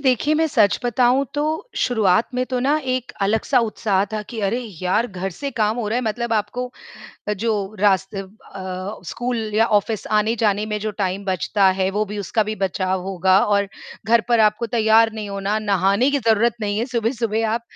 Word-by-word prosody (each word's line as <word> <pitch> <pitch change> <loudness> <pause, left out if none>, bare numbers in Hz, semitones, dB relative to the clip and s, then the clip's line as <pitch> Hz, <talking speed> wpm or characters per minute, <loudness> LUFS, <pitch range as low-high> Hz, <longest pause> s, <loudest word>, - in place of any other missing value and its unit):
देखिए 275 +2 +2
मैं 320 +1 +2
सच 220 -9 +3
बताऊँ 245 +3 +3
तो 290 - 0 0.3
शुरुआत 220 -4 +2
में 250 0 0
तो 255 - 0
ना 280 +4 +2 0.2
एक 255 -1 -4
अलग-सा 220 +6 +2
उत्साह 200 -2 0
था 215 -1 -2
कि, 225 +1 -7
अरे 205 +4 0 0.2
यार! 190 +6 +1
घर 190 -2 -5
से 280 +11 -5
काम 220 -3 0
हो 235 -3 -2
रहा 225 - 0
है, 250 - 0
मतलब 235 +1 -2
आपको 245 +4 -2 0.7
जो 225 +1 0 0.3
रास्ते 195 -1 +2
अ, 190 -1 -8
स्कूल 240 +8 -3 0.2
या 220 +1 +4
ऑफ़िस 215 +1 -4
आने-जाने 210 -1 +1
में 210 -1 -2
जो 215 +1 -2
टाइम 190 +2 -2
बचता 190 +1 +1
है, 190 0 +2
वो 210 +2 0
भी 210 0 -6
उसका 210 +3 0
भी 215 +1 -3
बचाव 190 -1 -1
होगा 190 0 +3
और 200 -1 +1 0.4
घर 230 +1 +5
पर 235 -2 +4
आपको 215 +2 +2
तैयार 225 0 +4
नहीं 215 -2 -6
होना, 200 +2 -1
नहाने 200 +4 +2
की 285 - +1
ज़रूरत 230 -1 +2
नहीं 205 -1 -1
है 230 - 0
सुबह-सुबह, 225 -1 0
आप 230 +1 -1
215 Hz, 190 wpm, -21 LUFS, 200-235 Hz, 0.7 s, घर